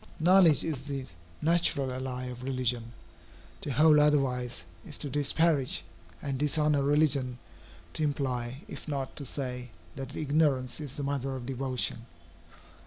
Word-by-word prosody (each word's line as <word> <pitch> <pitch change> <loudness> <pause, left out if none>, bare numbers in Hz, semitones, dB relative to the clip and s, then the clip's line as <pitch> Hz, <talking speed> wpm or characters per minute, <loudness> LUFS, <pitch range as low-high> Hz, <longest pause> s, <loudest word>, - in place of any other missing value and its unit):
Knowledge 175 -2 +6
is 150 -5 -2
the 135 -1 -5 0.4
natural 165 -5 +3
ally 130 0 -4
of 125 -1 -7
religion. 125 -3 -2 0.7
To - - -5
hold 150 +2 +6
otherwise, 130 -6 +1 0.2
is - - -6
to 145 - -5
disparage 145 - +2 0.4
and 135 -2 -2
dishonor 150 0 +3
religion 140 -3 +2 0.6
to - - -4
imply, 130 -2 -2
if - - -9
not 140 -3 -3
to 140 - -5
say, 125 -2 -3 0.3
that 135 +2 -7
ignorance 145 -4 +1
is 145 -3 -6
the 145 - -4
mother 135 -1 -2
of 125 -2 -6
devotion. 130 -2 -2
135 Hz, 135 wpm, -29 LUFS, 125-150 Hz, 0.7 s, Knowledge